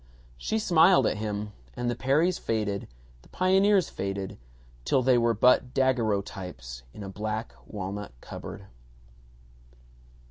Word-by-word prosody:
She 220 - -2
smiled 185 -3 +5
at - - +1
him, 105 -1 -3 0.2
and 120 - -2
the 120 - 0
Perrys 150 +9 +2
faded, 105 -3 -2 0.3
the - - -21
pioneers 190 0 +3
faded, 95 -3 -4 0.4
till 130 - +2
they 130 0 +5
were 115 -1 +3
but 125 +3 +4
daguerreotypes 100 - -1
in 105 - -9
a - - -6
black 110 +3 -4
walnut 100 - -5
cupboard. - - -8
110 Hz, 120 wpm, -27 LUFS, 100-135 Hz, 0.4 s, smiled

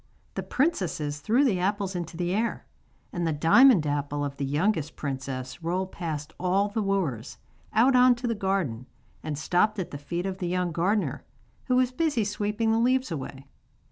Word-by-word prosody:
The - - -3
princesses 170 - -1
threw 225 - +2
the 200 -9 +2
apples 195 0 -1
into 170 -2 -5
the 175 0 -1
air, 225 +3 -1 0.5
and 175 -1 -1
the - - +1
diamond 165 - +6
apple 145 0 -1
of 140 -1 -6
the 140 - -2
youngest 155 +2 0
princess 130 -1 -5
rolled 185 +3 -2
past 155 -3 -5
all 190 +3 +1
the 215 +2 -2
wooers, 175 - -2 0.3
out 250 +5 +4
on 250 0 +6
to 240 +1 -7
the 235 - +1
garden, 190 - -2 0.3
and 150 -2 -4
stopped 180 +7 +1
at 185 - -4
the 145 - -6
feet 170 +5 -4
of 190 -1 -4
the 180 - -2
young 180 0 0
gardener, 175 - 0 0.4
who 255 - +1
was 255 0 +3
busy 290 -4 0
sweeping 210 +2 -1
the 225 - +2
leaves 255 0 +2
away. 135 -2 -6
180 Hz, 180 wpm, -27 LUFS, 150-215 Hz, 0.5 s, diamond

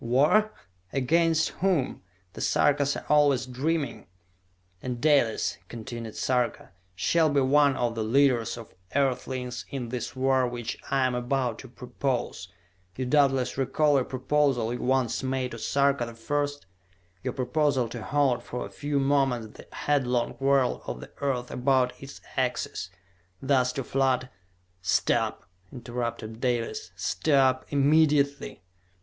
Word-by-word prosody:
"War? 150 - +3 0.4
Against 160 +4 +2
whom? 180 -8 0 0.3
The - - -8
Sarkas 140 -1 +2
are - - -8
always 145 -4 +4
dreaming!" 140 +4 -2 0.7
"And 125 -2 -4
Dalis," 140 -6 +2
continued 115 -1 -7
Sarka, 125 -5 -1 0.2
"shall 160 - +2
be 145 -1 +2
one 140 +1 +4
of 120 -1 0
the 115 -1 -2
leaders 125 0 +2
of 115 -2 -11 0.2
Earthlings 130 -2 -1
in 125 -4 -4
this 125 +1 -4
war 130 -1 +2
which 120 -1 -4
I 135 -1 +2
am 130 - 0
about 125 -1 -1
to 130 - -10
propose! 125 -4 -3 0.5
You 130 - -3
doubtless 135 -1 +2
recall 145 +3 +2
a - - 0
proposal 130 -3 0
you 125 - -5
once 130 -2 +1
made 130 -1 -2
to 115 - -7
Sarka 140 0 +1
the 115 - -9
First? 145 +4 -2 0.6
Your - - -3
proposal 135 -1 +1
to 120 0 -6
halt 140 -1 +1
for 125 - -5
a - - -10
few 145 -1 -2
moments 135 -5 +1
the - - -12
headlong 125 -5 0
whirl 135 -1 +2
of - - -4
the - - -11
earth 130 -3 -2
about 125 0 +2
its 135 0 -10
axis, 125 -8 -2 0.5
thus 130 -2 +2
to 135 - -3
flood 130 -1 0 0.3
" 90 0 -41
"Stop!" 95 - +1 0.3
interrupted 120 -2 -5
Dalis. 115 -7 -2
"Stop! 130 - +2
Immediately!" 145 - +2
130 Hz, 140 wpm, -27 LUFS, 120-140 Hz, 0.7 s, always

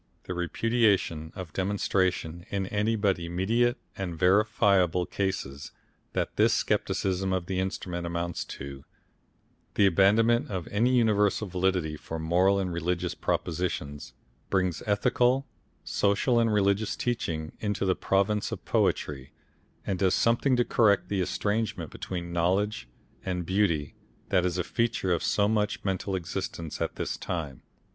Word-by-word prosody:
The 90 - -5
repudiation 90 -3 +1
of 90 -5 -7
demonstration 95 -3 0
in 100 -1 -1
any 105 +3 0
but 100 -4 +1
immediate 105 +9 +1 0.2
and 90 -4 -4
verifiable 95 -1 +3
cases 85 -9 -3 0.4
that - - -2
this - - +4
Scepticism 95 0 0
of 95 -2 -1
the 95 0 -2
Instrument 90 -2 -3
amounts 85 0 -2
to, 70 0 -8 0.9
the 100 - +5
abandonment 105 +6 +4
of 95 -5 -4
any 120 +5 +2
universal 105 -3 +2
validity 90 -4 0
for 80 - -6
moral 90 +5 +3
and 95 -3 -1
religious 85 +1 -1
propositions, 80 -4 -3 0.4
brings 90 -3 0
ethical, 120 +6 +2 0.4
social 105 +4 +2
and 115 -1 +2
religious 100 +1 +2
teaching 80 -10 -2
into 105 -2 -1
the 95 - +3
province 100 +2 +1
of - - -6
poetry, 65 -3 0 0.5
and 95 -2 -2
does 95 -1 +3
something 120 +3 +3
to 120 0 +2
correct 105 -4 +3
the 100 -2 0
estrangement 105 -3 -1
between 85 -2 -5
knowledge 90 - 0 0.3
and 90 -2 -2
beauty 85 -6 +1 0.4
that 90 -2 +3
is 90 0 -2
a 90 - 0
feature 110 -2 0
of 85 - 0
so 100 -1 +2
much 105 -1 0
mental 95 0 -1
existence 85 -2 -4
at - - -2
this - - -3
time. 75 -7 -4
95 Hz, 135 wpm, -28 LUFS, 85-105 Hz, 0.9 s, the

